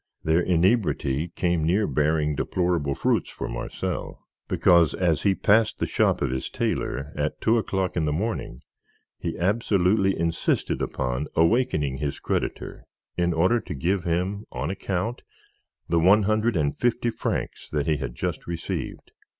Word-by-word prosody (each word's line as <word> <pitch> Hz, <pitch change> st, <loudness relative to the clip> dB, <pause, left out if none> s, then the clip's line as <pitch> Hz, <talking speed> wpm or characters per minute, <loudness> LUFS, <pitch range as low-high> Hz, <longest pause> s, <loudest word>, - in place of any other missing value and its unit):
Their 80 Hz, +2 st, +3 dB
inebriety 85 Hz, -, +1 dB
came 85 Hz, -3 st, +1 dB
near 95 Hz, +7 st, +2 dB
bearing 75 Hz, -1 st, +1 dB
deplorable 85 Hz, -3 st, 0 dB
fruits -, -, +1 dB
for -, -, -5 dB
Marcel, -, -, -5 dB, 0.2 s
because 85 Hz, -3 st, +4 dB
as 85 Hz, -6 st, +1 dB
he 100 Hz, -1 st, +2 dB
passed 110 Hz, +3 st, +3 dB
the -, -, -1 dB
shop -, -, +1 dB
of -, -, 0 dB
his 65 Hz, 0 st, -3 dB
tailor, 70 Hz, +3 st, -2 dB
at 75 Hz, +1 st, -2 dB
two 115 Hz, +1 st, +3 dB
o'clock 95 Hz, -4 st, -2 dB
in 85 Hz, -3 st, +1 dB
the 75 Hz, -, 0 dB
morning, 85 Hz, -, -3 dB, 0.6 s
he 85 Hz, -, -4 dB
absolutely 95 Hz, 0 st, +2 dB
insisted 85 Hz, 0 st, 0 dB
upon 65 Hz, +3 st, -2 dB
awakening 80 Hz, -, +2 dB
his 70 Hz, 0 st, -3 dB
creditor -, -, -3 dB, 0.3 s
in 85 Hz, 0 st, +1 dB
order 90 Hz, +8 st, +3 dB
to 90 Hz, -, -7 dB
give 90 Hz, +6 st, 0 dB
him, 90 Hz, +5 st, -1 dB
on -, -, -3 dB
account, 100 Hz, +4 st, -3 dB, 0.7 s
the 85 Hz, -, +2 dB
one 100 Hz, +5 st, +5 dB
hundred 110 Hz, +2 st, +1 dB
and 75 Hz, -3 st, +1 dB
fifty 120 Hz, 0 st, +1 dB
francs -, -, -4 dB
that 75 Hz, -2 st, -1 dB
he 75 Hz, -1 st, +1 dB
had -, -, -5 dB
just -, -, -4 dB
received. 85 Hz, -1 st, -5 dB
85 Hz, 150 wpm, -25 LUFS, 75-100 Hz, 0.7 s, one